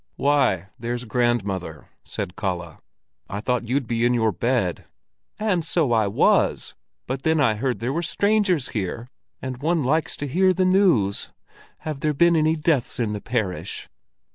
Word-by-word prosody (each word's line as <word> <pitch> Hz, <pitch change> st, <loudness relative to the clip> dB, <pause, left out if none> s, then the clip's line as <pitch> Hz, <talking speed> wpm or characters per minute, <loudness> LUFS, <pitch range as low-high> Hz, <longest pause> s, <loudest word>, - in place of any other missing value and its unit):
"Why, 135 Hz, -10 st, +2 dB
there's 120 Hz, +1 st, -3 dB
grandmother!" 100 Hz, -9 st, -1 dB, 0.2 s
said 90 Hz, -, -5 dB
Kalle. 90 Hz, -6 st, -4 dB, 0.5 s
"I 100 Hz, -, -4 dB
thought 120 Hz, +1 st, -1 dB
you'd 130 Hz, +2 st, 0 dB
be 115 Hz, 0 st, -1 dB
in 120 Hz, 0 st, +3 dB
your 110 Hz, -2 st, +2 dB
bed." 100 Hz, -2 st, -1 dB, 0.5 s
"And 200 Hz, -6 st, 0 dB
so 155 Hz, -5 st, +1 dB
I 110 Hz, -3 st, +3 dB
was, 100 Hz, -, +2 dB, 0.3 s
but 130 Hz, +1 st, -3 dB
then 160 Hz, +2 st, +2 dB
I 130 Hz, -6 st, +4 dB
heard 125 Hz, +3 st, -1 dB
there 120 Hz, +6 st, -2 dB
were 170 Hz, -, 0 dB
strangers 190 Hz, -3 st, +1 dB
here, 110 Hz, +3 st, -4 dB, 0.4 s
and 130 Hz, -1 st, -5 dB
one 160 Hz, 0 st, +1 dB
likes 155 Hz, +5 st, 0 dB
to 145 Hz, -, -4 dB
hear 185 Hz, +7 st, +3 dB
the 185 Hz, +1 st, +1 dB
news. 180 Hz, -, +2 dB, 0.5 s
Have 155 Hz, -3 st, -4 dB
there 150 Hz, +1 st, 0 dB
been 170 Hz, +3 st, +4 dB
any 155 Hz, 0 st, +3 dB
deaths 155 Hz, -7 st, 0 dB
in 110 Hz, -3 st, 0 dB
the 105 Hz, -, -5 dB
parish?" 110 Hz, -7 st, -3 dB
125 Hz, 165 wpm, -23 LUFS, 110-155 Hz, 0.5 s, I